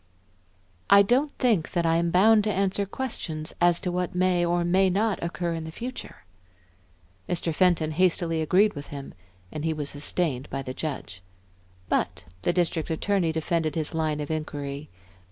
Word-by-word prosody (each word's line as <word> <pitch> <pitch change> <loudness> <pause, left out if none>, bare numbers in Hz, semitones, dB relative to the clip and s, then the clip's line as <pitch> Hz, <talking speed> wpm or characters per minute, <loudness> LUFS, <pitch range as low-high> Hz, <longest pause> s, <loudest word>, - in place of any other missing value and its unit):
"I 200 0 +8
don't 260 +8 +2
think 220 - +1
that 170 -2 +1
I 165 0 +3
am 170 0 +1
bound 210 +5 +5
to 215 - +1
answer 195 +1 0
questions 170 -11 -4
as 175 0 +4
to 180 - -2
what 180 0 -2
may 180 -1 +2
or 175 0 +1
may 190 +2 +3
not 205 +3 0
occur 170 0 -2
in 165 -1 -4
the 160 - -7
future." 240 - -7 1.1
Mr. 170 -1 -1
Fenton 165 -3 +2
hastily 165 -1 +1
agreed 195 +7 +3
with 145 0 -8
him, 140 -1 -8 0.4
and 150 - -5
he 160 0 +1
was 145 -2 -4
sustained 145 -2 -2
by 135 - -3
the 130 -1 -5
judge. 135 -11 -5 0.7
But - - -1 0.2
the - - +2
District 170 -2 0
Attorney 170 +1 +1
defended 160 -1 -1
his 160 0 -2
line 155 -2 0
of 150 - -4
inquiry. 145 -2 -4
170 Hz, 170 wpm, -26 LUFS, 155-185 Hz, 1.1 s, I